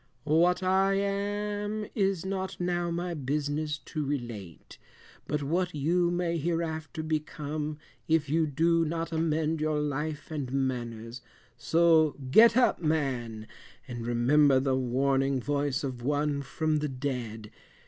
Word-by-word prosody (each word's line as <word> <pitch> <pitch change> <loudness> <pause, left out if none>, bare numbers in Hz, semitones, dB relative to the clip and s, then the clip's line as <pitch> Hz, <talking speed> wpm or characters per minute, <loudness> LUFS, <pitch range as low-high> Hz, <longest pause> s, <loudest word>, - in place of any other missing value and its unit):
"What 170 +5 +3
I 190 +1 +3
am 205 +1 -2
is 195 -5 0
not 190 -1 -3
now 175 -1 0
my 175 +1 -2
business 150 +1 -2
to 155 - -3
relate, 120 - -6 0.5
but 150 0 -1
what 175 +4 -1
you 170 +5 +2
may 175 -1 -1
hereafter 160 -1 -2
become 155 -1 -3 0.3
if 160 -2 +2
you 160 +2 +2
do 165 +3 +2
not 165 +1 -3
amend 160 -1 0
your 155 -1 +1
life 150 +1 -3
and 140 -5 -3
manners; 120 -3 -3 0.3
so 160 -2 +3 0.2
get 230 - +7
up 250 -7 +3
man, 130 -9 -1 0.4
and 120 -2 -5
remember 130 +4 +4
the 135 0 +1
warning 135 +1 +1
voice 140 0 -1
of 130 -3 -4
one 145 +2 0
from 155 +3 -1
the 150 0 -2
dead. 125 -5 -4
150 Hz, 130 wpm, -29 LUFS, 135-170 Hz, 0.5 s, get